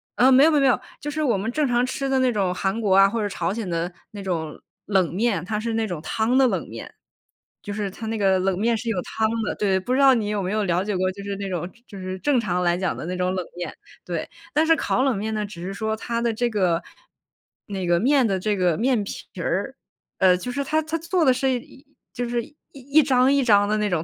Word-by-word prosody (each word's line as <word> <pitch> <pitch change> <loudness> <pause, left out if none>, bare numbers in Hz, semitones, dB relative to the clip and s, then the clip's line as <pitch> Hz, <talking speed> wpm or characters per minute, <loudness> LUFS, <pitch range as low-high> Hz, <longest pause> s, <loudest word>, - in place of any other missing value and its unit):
嗯， 260 +2 +5
没 270 +2 +7
有 320 - +6
没 300 - +3
有 - - +3
没 270 - +4
有， 255 - +3 0.2
就 295 - -5
是 310 +1 -2
我 235 -8 +2
们 210 +4 -3
正 300 +2 +1
常 245 0 +2
吃 270 +1 -3
的 265 -1 +2
那 255 -1 +3
种 190 -4 0
韩 195 +4 -1
国 200 -3 +2
啊 195 0 +7
或 230 0 -2
者 205 - -1
朝 175 0 -2
鲜 220 -4 -4
的 170 +1 -2 0.2
那 205 -2 -8
种 165 -5 -3 0.3
冷 190 -5 +1
面， 205 -5 +1
它 210 +1 -2
是 225 +1 -2
那 225 -1 0
种 175 -5 -5
汤 225 +9 +1
的 265 - +6
冷 - - -2
面， - - -9 0.7
就 205 - -5
是 205 -1 -2
它 225 - -8
那 225 - -2
个 190 -2 +3
冷 190 0 0
面 230 +1 +2
是 235 - -7
有 190 -6 0
汤 220 0 -1 0.2
的， - - -2
对， 195 -2 +1
不 245 +7 -5
知 265 - +2
道 270 -1 +7
你 220 -4 0
有 205 -2 -1
没 185 - -2
有 215 -1 0
了 180 +1 +1
解 205 -1 -2
过， 185 0 +1
就 200 +1 -9
是 200 0 -4
那 200 -1 -4
种 175 -1 -3 0.2
就 200 - -10
是 185 0 -5
正 285 +1 +2
常 180 -5 -1
来 175 0 +2
讲 185 -1 -1
的 - - -6
那 180 0 -3
种 180 0 0
冷 185 - -2
面， 175 - -4 0.3
对。 - - -4 0.2
但 310 +2 +3
是 325 - +6
烤 260 - 0
冷 265 -7 +1
面 220 +2 -3
呢， 215 -1 -1
只 175 -4 -9
是 195 - -4
说 220 +1 -2
它 235 +1 -3
的 235 -1 +1
这 240 +2 0
个 180 -5 +1 0.8
那 190 -3 -4
个 170 0 +3
面 265 0 +3
的 195 -2 0
这 210 +2 0
个 175 -3 +2
面 245 -3 +1
皮 - - -7 0.2
儿， - - -2 0.4
呃， 185 -1 +5
就 245 +7 -5
是 280 +2 -2
它 310 +3 +1
它 315 +2 -2
做 335 0 +1
的 260 - +6
是 265 +1 0
一 270 +4 -17 0.3
就 245 -1 -3
是 240 -1 -1 0.3
一 280 +3 +3
张 260 -1 +3
一 280 -2 +3
张 205 -3 +4
的 215 +1 +1
那 210 -1 0
种， 165 -3 0
215 Hz, 285 characters per minute, -23 LUFS, 190-250 Hz, 0.8 s, 没